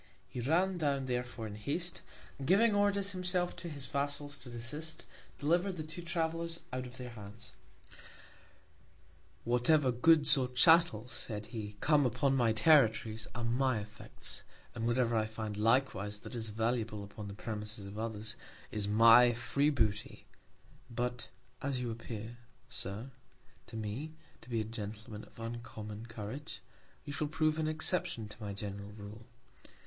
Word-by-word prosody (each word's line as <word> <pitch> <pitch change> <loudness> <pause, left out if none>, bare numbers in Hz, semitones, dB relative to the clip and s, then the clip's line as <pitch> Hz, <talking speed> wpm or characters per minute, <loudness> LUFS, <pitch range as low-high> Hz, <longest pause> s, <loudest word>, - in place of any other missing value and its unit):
He - - -6
ran 175 +8 +2
down 140 -3 +1
therefore 125 -2 -2
in 105 - -5
Haste, 150 +11 -2 0.4
and 135 - -4
giving 210 +5 +5
Orders 200 -1 +2
himself 180 -1 0
to 170 -1 -5
his 140 -4 -5
Vassals 145 +1 -1
to 125 - -8
desist, 150 +7 -4 0.3
deliver'd 175 +6 +1
the 155 - -3
two 155 +3 -7
Travellers 165 -1 -1
out 130 0 -2
of 125 +1 -11
their 125 -1 -6
Hands. 105 -1 -10 1.9
Whatever 125 +4 +4
Goods 150 +4 +5
or 130 - +1
Chattels, 125 -3 +5
said 105 -2 -2
he, 105 -3 -6
come 150 -3 +5
upon 135 +3 +2
my 120 -4 +4
Territories, 110 -4 +4
are 120 - -2
my 125 +1 +2
Effects; 105 0 -6 0.3
and 115 0 -2
whatever 120 -1 +2
I 110 -1 +2
find 110 -1 -4
likewise 105 -2 +2
that - - -9
is 115 -2 -2
valuable 110 -1 -1
upon 100 +1 -8
the 100 - -7
Premises 105 -1 -4
of 100 +2 -7
others, 110 -1 -3 0.4
is 105 -1 +1
my 115 +3 +8
free 140 +5 +2
Booty; 110 -7 0 0.6
but, 120 +1 -2 0.3
as 135 -2 -1
you 120 -2 -2
appear, 115 0 -6 0.3
Sir, 110 +3 -4 0.6
to 115 - -7
me 110 +9 -4 0.3
to - - -14
be 115 -2 0
a - - +1
Gentleman 110 0 -7
of - - -18
uncommon 115 -1 -6
Courage, 110 +6 -6 0.4
you 145 - -5
shall 150 0 -1
prove 155 +1 +1
an 155 - +1
Exception 155 - +1
to 105 - -10
my 105 -1 -3
general 100 0 -6
Rule. 105 +3 -10
120 Hz, 155 wpm, -34 LUFS, 110-150 Hz, 1.9 s, my